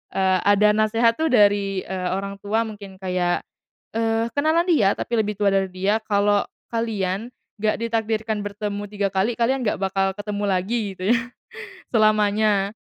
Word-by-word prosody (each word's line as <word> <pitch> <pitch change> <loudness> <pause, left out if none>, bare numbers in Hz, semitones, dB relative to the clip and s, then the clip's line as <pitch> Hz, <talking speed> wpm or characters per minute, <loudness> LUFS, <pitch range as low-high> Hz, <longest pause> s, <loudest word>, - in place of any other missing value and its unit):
eee, 190 -1 +2
ada 210 +1 +5
nasehat 225 +2 +2
tuh 320 - +2
dari, 200 -4 +3
eee, 185 -1 -3
orang 200 +1 -4
tua 220 +3 +1
mungkin 200 -3 -10
kayak, 180 -2 -1 0.5
eee, 225 0 +1
kenalan 315 +4 +3
dia 225 - +4
tapi 235 - -5
lebih 210 -1 -1
tua 200 -1 +3
dari 195 -1 +2
dia 195 +4 0
kalau 205 -1 +2 0.3
kalian, 215 -2 -2 0.3
gak 215 0 +2
ditakdirkan 220 -1 -1
bertemu 205 0 -4
3 200 -1 -1
kali, 195 +5 +1
kalian 255 +3 +1
gak - - -1
bakal 195 0 +1
ketemu 205 0 -4
lagi 190 +6 0 0.2
gitu 185 - -8
ya 235 - +2 0.7
selamanya. 210 -2 +2
205 Hz, 155 wpm, -23 LUFS, 195-225 Hz, 0.7 s, ada